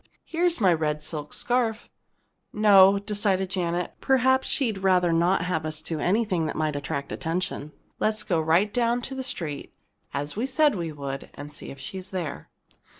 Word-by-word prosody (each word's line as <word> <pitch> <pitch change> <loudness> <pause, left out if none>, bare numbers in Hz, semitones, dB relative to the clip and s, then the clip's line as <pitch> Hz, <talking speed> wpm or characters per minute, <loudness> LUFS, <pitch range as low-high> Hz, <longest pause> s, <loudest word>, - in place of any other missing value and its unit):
Here's 340 -1 +1
my 190 -5 +5
red 150 -2 -1
silk 150 -2 -6
scarf." 240 -2 0 0.6
"No," 200 -2 +6
decided 200 -2 0
Janet. 175 -2 -1
"Perhaps 260 0 +3
she'd 225 -8 +1
rather 180 -3 +3
not 170 +2 +2
have 170 -3 -1
us 155 -1 -4
do 160 -2 -4
anything 185 -3 +1
that - - -4
might 155 -1 -1
attract 140 0 -4
attention. 165 -3 -3 0.3
Let's 215 0 0
go 170 -5 +1
right 170 +6 +2
down 240 0 +1
to 270 - -5
the 265 0 -4
street, 155 - -5 0.4
as 145 +2 -3
we 235 +5 -1
said 295 +2 +3
we 170 -4 -3
would, 140 -2 -6
and 145 +1 -8
see - - -8
if 135 - -9
she's 185 +7 -7
there." 165 - -5
185 Hz, 170 wpm, -26 LUFS, 155-215 Hz, 0.6 s, No